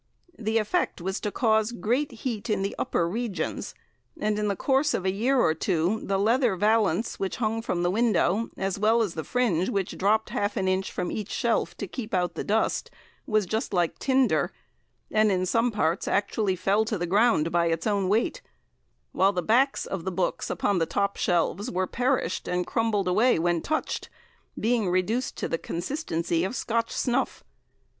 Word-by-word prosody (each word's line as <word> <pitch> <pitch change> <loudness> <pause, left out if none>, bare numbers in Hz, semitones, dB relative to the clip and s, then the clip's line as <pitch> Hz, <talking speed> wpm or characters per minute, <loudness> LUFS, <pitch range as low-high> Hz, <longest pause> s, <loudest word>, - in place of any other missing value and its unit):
The 220 0 0
effect 225 - 0
was 190 +3 -3
to 210 - -2
cause 220 -1 +2
great 240 +7 -1
heat 230 -2 -4
in 210 -2 +1
the 195 - -2
upper 170 - 0
regions, 200 -4 -3 0.4
and 210 0 0
in 210 - 0
the 200 - 0
course 275 +7 +2
of 190 - -3
a 190 - +2
year 245 +7 +1
or 160 - +4
two 175 +4 0
the 195 - 0
leather 230 +2 +2
valance 210 -1 +1
which 195 - -2
hung 225 -1 -1
from 175 -6 -2
the 175 - +2
window, 220 -1 +2
as 195 0 -2
well 225 +2 +4
as 195 -6 -3
the 160 - -4
fringe 195 -8 +1
which 195 -2 -2
dropped 215 +3 +2
half 205 +3 -1
an 190 -2 0
inch 185 0 0
from 175 - -3
each 210 -2 -4
shelf 220 -7 0
to - - -4
keep 215 +1 -5
out 180 -1 0
the - - -4
dust, 220 +2 0 0.4
was 215 -4 +2
just 220 +1 -2
like 175 -2 0
tinder, 265 -1 +2 0.6
and 215 -1 +3
in 185 -1 +1
some 230 +6 +2
parts 180 -6 0
actually 200 -1 +1
fell 195 +4 +2
to 220 -1 -2
the 175 - -2
ground 195 -3 +3
by 170 -1 +2
its 165 0 -1
own 200 -3 +1
weight; 230 - +1 0.7
while 195 +1 +3
the 180 -2 -1
backs 260 - +2
of 190 -4 -4
the 190 - -2
books 180 0 -1
upon 200 -3 0
the 165 - +1
top 200 0 0
shelves 180 +5 0
were 185 -2 0
perished, 245 -3 -1
and 180 0 0
crumbled 220 -4 0
away 220 +8 +3
when 170 0 +1
touched, 310 +1 -2 0.5
being 225 -4 +1
reduced 210 +8 0
to - - -2
the 165 - -2
consistency 170 - -2
of 195 +7 -2
Scotch 230 -1 -1
snuff. 250 +2 -1
205 Hz, 190 wpm, -26 LUFS, 180-230 Hz, 0.7 s, or